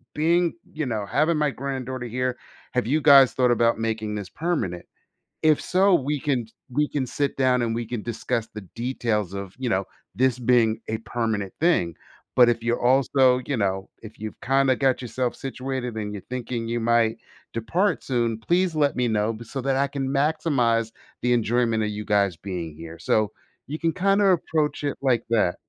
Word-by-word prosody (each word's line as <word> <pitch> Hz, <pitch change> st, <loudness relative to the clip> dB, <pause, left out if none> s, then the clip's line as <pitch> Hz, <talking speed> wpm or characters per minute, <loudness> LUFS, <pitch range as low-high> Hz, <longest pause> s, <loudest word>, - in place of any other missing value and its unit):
being 170 Hz, +2 st, +2 dB, 0.2 s
you 155 Hz, -1 st, -2 dB
know, 110 Hz, -4 st, -2 dB
having 155 Hz, -, +1 dB
my 150 Hz, -1 st, +1 dB
granddaughter 130 Hz, -2 st, -4 dB
here 125 Hz, +2 st, -2 dB, 0.4 s
have 125 Hz, -2 st, +1 dB
you 155 Hz, +4 st, +2 dB
guys 140 Hz, -3 st, +7 dB
thought 125 Hz, -1 st, +2 dB
about 115 Hz, -1 st, +2 dB
making 110 Hz, -1 st, -2 dB
this 100 Hz, -4 st, -5 dB
permanent? 145 Hz, -, -2 dB, 0.6 s
If 155 Hz, -2 st, +4 dB
so, 190 Hz, +1 st, +3 dB
we 145 Hz, -1 st, -1 dB
can 130 Hz, -6 st, -1 dB, 0.2 s
we 150 Hz, +4 st, +1 dB
can 140 Hz, -3 st, -1 dB
sit 140 Hz, +2 st, -2 dB
down 130 Hz, -2 st, +3 dB
and 115 Hz, -1 st, 0 dB
we 120 Hz, 0 st, -2 dB
can 120 Hz, -1 st, -4 dB
discuss 115 Hz, 0 st, -2 dB
the 105 Hz, -, -6 dB
details 115 Hz, -5 st, -1 dB
of, 100 Hz, -1 st, -6 dB
you 130 Hz, -2 st, -2 dB
know, 95 Hz, -3 st, +1 dB, 0.3 s
this 130 Hz, 0 st, +2 dB
being 115 Hz, -2 st, +3 dB
a 110 Hz, -, -1 dB
permanent 110 Hz, -4 st, -2 dB
thing. 90 Hz, -, +2 dB, 0.4 s
But 125 Hz, -1 st, +7 dB
if 115 Hz, -1 st, 0 dB
you're 120 Hz, +1 st, 0 dB
also, 130 Hz, 0 st, +4 dB
you 140 Hz, -, -1 dB
know, 95 Hz, -2 st, -1 dB
if 110 Hz, -1 st, -12 dB
you've 110 Hz, 0 st, -7 dB
kinda 135 Hz, 0 st, +3 dB
got 130 Hz, 0 st, +1 dB
yourself 125 Hz, 0 st, -2 dB
situated 130 Hz, -2 st, -4 dB
and 105 Hz, -1 st, -3 dB
you're 100 Hz, -, -7 dB
thinking 120 Hz, -2 st, -4 dB
you 120 Hz, +1 st, -1 dB
might 115 Hz, -1 st, +2 dB, 0.4 s
depart 170 Hz, -, 0 dB
soon, 120 Hz, -3 st, 0 dB
please 175 Hz, +6 st, +1 dB
let 145 Hz, -2 st, +2 dB
me 125 Hz, -1 st, +2 dB
know 110 Hz, 0 st, +1 dB
b 115 Hz, +2 st, -9 dB
so 135 Hz, +4 st, -5 dB
that 135 Hz, +1 st, 0 dB
I 140 Hz, +1 st, +2 dB
can 135 Hz, -1 st, -3 dB
maximize 135 Hz, -6 st, +1 dB, 0.3 s
the 125 Hz, -, +1 dB
enjoyment 115 Hz, -1 st, +1 dB
of 105 Hz, -, -1 dB
you 105 Hz, 0 st, -5 dB
guys 100 Hz, -3 st, +2 dB
being 85 Hz, -5 st, -5 dB
here 80 Hz, +1 st, -9 dB
so, 105 Hz, +4 st, +1 dB, 0.4 s
you 150 Hz, +4 st, -5 dB
can 165 Hz, -1 st, 0 dB
kinda 195 Hz, +2 st, +2 dB
approach 160 Hz, -5 st, +1 dB
it 145 Hz, -, -2 dB
like 125 Hz, -4 st, +2 dB
that. 110 Hz, -6 st, +2 dB
125 Hz, 190 wpm, -24 LUFS, 110-140 Hz, 0.6 s, guys